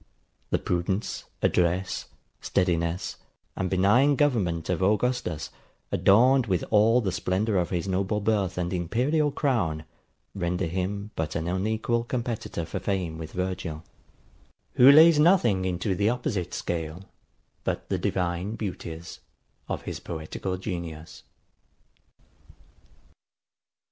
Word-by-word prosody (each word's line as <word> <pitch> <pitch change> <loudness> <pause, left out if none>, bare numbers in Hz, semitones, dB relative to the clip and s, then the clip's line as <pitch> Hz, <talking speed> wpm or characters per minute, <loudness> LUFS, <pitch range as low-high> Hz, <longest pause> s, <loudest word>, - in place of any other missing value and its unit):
The - - +2
prudence, 90 +4 -2 0.2
address, 90 +2 +1 0.3
steadiness, 85 -1 0 0.4
and 95 -1 -2
benign 105 +10 +4
government 105 - +1
of 90 -1 -1
Augustus, 105 -4 0 0.4
adorned 125 +5 +4
with 90 -4 0
all 110 +3 +5
the 100 -4 -1
splendour 100 +4 0
of 90 -2 0
his 90 0 -2
noble 95 +2 0
birth 100 -4 0
and 90 +1 -2
imperial 125 - +1
crown, 115 - 0 0.5
render 90 -1 -1
him 95 +4 -3
but 80 -1 -3
an 80 +1 -2
unequal 110 +5 0
competitor 115 -7 -3
for - - -4
fame 90 -5 -2
with 80 -1 -7
Virgil, 90 -4 -3 0.9
who 130 +3 +8
lays 160 +1 +8
nothing 125 - +4
into 95 +2 -1
the 100 +4 +2
opposite 105 -8 -2
scale 80 +1 -4 0.6
but - - -3
the - - 0
divine 90 +3 -1
beauties 85 -6 -6 0.5
of - - -3
his - - -5
poetical 85 +3 -5
genius. 85 -5 -6
95 Hz, 115 wpm, -26 LUFS, 85-110 Hz, 0.9 s, who